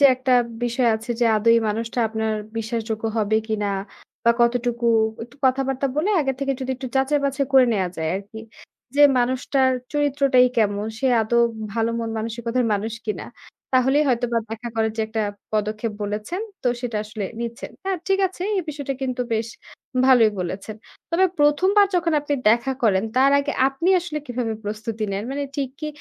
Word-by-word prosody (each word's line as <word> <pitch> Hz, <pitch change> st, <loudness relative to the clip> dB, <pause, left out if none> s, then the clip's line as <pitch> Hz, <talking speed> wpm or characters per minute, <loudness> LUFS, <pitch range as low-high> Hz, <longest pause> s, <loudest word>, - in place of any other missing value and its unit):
যে 285 Hz, -, +6 dB
একটা 255 Hz, 0 st, 0 dB, 0.3 s
বিষয় 240 Hz, +1 st, +1 dB
আছে 230 Hz, +2 st, -9 dB
যে -, -, +4 dB
আদৌ 215 Hz, +2 st, +1 dB
এই 230 Hz, -, +4 dB
মানুষটা 230 Hz, +3 st, -3 dB
আপনার 220 Hz, 0 st, -1 dB, 0.2 s
বিশ্বাসযোগ্য 225 Hz, -1 st, -3 dB
হবে 215 Hz, 0 st, +2 dB
কিনা 210 Hz, -2 st, -1 dB, 0.6 s
বা 235 Hz, -, +6 dB
কতটুকু 235 Hz, 0 st, +1 dB, 0.4 s
একটু 240 Hz, +3 st, -19 dB
কথাবার্তা 270 Hz, +1 st, +1 dB
বলে 360 Hz, +8 st, +1 dB
আগে 270 Hz, -2 st, 0 dB
থেকে 275 Hz, -1 st, 0 dB
যদি 260 Hz, 0 st, -3 dB
একটু 260 Hz, -, -6 dB
যাচাই 275 Hz, +2 st, +2 dB
বাছাই 275 Hz, 0 st, 0 dB
করে 260 Hz, -2 st, +7 dB
নেয়া 190 Hz, -4 st, 0 dB
যায় 160 Hz, -1 st, -2 dB
আরকি। 205 Hz, +3 st, -9 dB, 0.6 s
যে 290 Hz, -, +5 dB, 0.2 s
মানুষটার 260 Hz, +2 st, +2 dB, 0.2 s
চরিত্রটাই 280 Hz, -3 st, +3 dB
কেমন, 205 Hz, -1 st, +1 dB
সে 270 Hz, -, 0 dB, 0.2 s
আদৌ 235 Hz, +2 st, +1 dB, 0.4 s
ভালো 225 Hz, 0 st, +1 dB
মন 230 Hz, -1 st, -3 dB
মানসিকতার 235 Hz, +2 st, -2 dB
মানুষ 210 Hz, +2 st, -1 dB
কিনা 215 Hz, -, -3 dB, 0.5 s
তাহলেই 265 Hz, +3 st, +4 dB
হয়তোবা 240 Hz, -1 st, +1 dB
দেখা 225 Hz, +2 st, -5 dB
করার 220 Hz, -1 st, +1 dB
যে -, -, -1 dB
একটা 220 Hz, 0 st, -1 dB, 0.3 s
পদক্ষেপ 215 Hz, +1 st, -1 dB
বলেছেন 210 Hz, -, -3 dB, 0.2 s
তো 250 Hz, -, +2 dB
সেটা 240 Hz, -3 st, -3 dB
আসলে 215 Hz, -1 st, -5 dB, 0.2 s
নিচ্ছেন। 235 Hz, 0 st, -5 dB
হ্যাঁ, 385 Hz, -1 st, -1 dB
ঠিক 390 Hz, 0 st, +3 dB
আছে। 365 Hz, -1 st, -9 dB
এই 370 Hz, -, 0 dB
বিষয়টা 280 Hz, -2 st, -3 dB
কিন্তু 255 Hz, -1 st, -1 dB
বেশ 220 Hz, +1 st, -1 dB, 0.6 s
ভালোই 240 Hz, -5 st, +6 dB
বলেছেন। 195 Hz, +4 st, -5 dB, 0.3 s
তবে 345 Hz, +3 st, +3 dB
১ম 295 Hz, +5 st, +3 dB
বার 405 Hz, -1 st, +7 dB
যখন 335 Hz, -2 st, +1 dB
আপনি 290 Hz, 0 st, -1 dB, 0.2 s
দেখা 235 Hz, +4 st, +2 dB
করেন 200 Hz, -3 st, +3 dB
তার 270 Hz, +2 st, +5 dB
আগে 280 Hz, +1 st, -1 dB, 0.2 s
আপনি 275 Hz, +6 st, -2 dB
আসলে 325 Hz, -3 st, -4 dB
কিভাবে 245 Hz, -2 st, -2 dB
প্রস্তুতি 215 Hz, +1 st, -4 dB
নেন? 195 Hz, -, -2 dB
মানে 285 Hz, +1 st, -2 dB
ঠিক 275 Hz, -3 st, -1 dB
কি 305 Hz, -, -3 dB
240 Hz, 175 wpm, -23 LUFS, 220-275 Hz, 0.6 s, করে